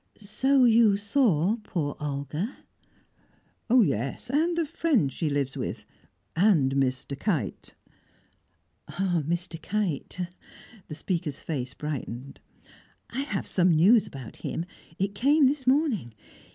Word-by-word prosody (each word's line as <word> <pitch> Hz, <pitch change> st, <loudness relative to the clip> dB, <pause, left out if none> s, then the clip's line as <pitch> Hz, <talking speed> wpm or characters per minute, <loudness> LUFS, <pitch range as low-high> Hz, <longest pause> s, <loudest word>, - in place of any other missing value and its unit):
"So 260 Hz, +6 st, +2 dB
you 225 Hz, -4 st, +5 dB
saw 205 Hz, -, +2 dB
poor 160 Hz, -9 st, -3 dB
Olga?" 150 Hz, -, -3 dB, 1.1 s
"Yes, 180 Hz, -, +2 dB
and 330 Hz, +4 st, +1 dB
the 335 Hz, -, +2 dB
friend 285 Hz, -, +1 dB
she 160 Hz, -, -1 dB
lives 140 Hz, -2 st, -1 dB
with 105 Hz, +5 st, -4 dB, 0.5 s
and 165 Hz, -8 st, +4 dB
Mr. 135 Hz, 0 st, 0 dB
Kite." 155 Hz, -, -2 dB, 1.1 s
"Ah! 180 Hz, -3 st, 0 dB
Mr. 170 Hz, 0 st, -3 dB
Kite!" 185 Hz, -4 st, -2 dB, 0.7 s
The 150 Hz, -, -6 dB
speaker's 160 Hz, -2 st, -2 dB
face 130 Hz, -5 st, -4 dB
brightened. 140 Hz, -3 st, -6 dB, 0.7 s
"I 245 Hz, -, -3 dB
have 270 Hz, -9 st, -2 dB, 0.2 s
news 185 Hz, +7 st, +5 dB
about 130 Hz, -5 st, -9 dB
him; 165 Hz, -, -4 dB, 0.3 s
it 195 Hz, +1 st, -1 dB
came 280 Hz, +7 st, +4 dB
this 265 Hz, -1 st, 0 dB
morning. 255 Hz, -, +1 dB
180 Hz, 110 wpm, -27 LUFS, 140-235 Hz, 1.1 s, you